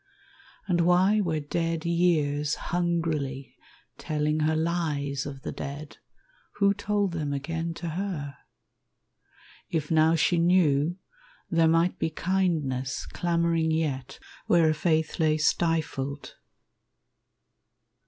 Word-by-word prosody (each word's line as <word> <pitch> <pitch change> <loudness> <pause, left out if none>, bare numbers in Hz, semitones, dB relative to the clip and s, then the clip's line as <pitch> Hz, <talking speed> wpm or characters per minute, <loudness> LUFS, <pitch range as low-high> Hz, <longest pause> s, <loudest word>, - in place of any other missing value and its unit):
And 175 -3 +2
why 185 +5 +4
were 160 -4 -1
dead 165 +2 -2
years 155 -4 +1
hungrily 165 -6 -2 0.4
telling 150 -1 -1
her 155 +1 +1
Lies 150 -4 -1
of 135 -2 -8
the - - -4
dead, 145 +2 -7 0.6
who 200 -1 +3
told 205 -1 -1
them 155 -4 -3
again 165 +4 -3
to 170 - -5
her? 160 -5 -4 1.3
If 155 -2 -2
now 160 +1 +4
she 170 +2 +2
knew, 170 -2 +3 0.5
there 165 -1 +4
might 165 +2 +2
be - - 0
kindness 155 -7 -1
Clamoring 170 -1 0
yet 150 -5 -2 0.3
where 170 -2 +4
a 155 - +3
faith 160 +1 0
lay 155 -1 +3
stifled. 150 -3 -1
160 Hz, 110 wpm, -27 LUFS, 150-170 Hz, 1.3 s, why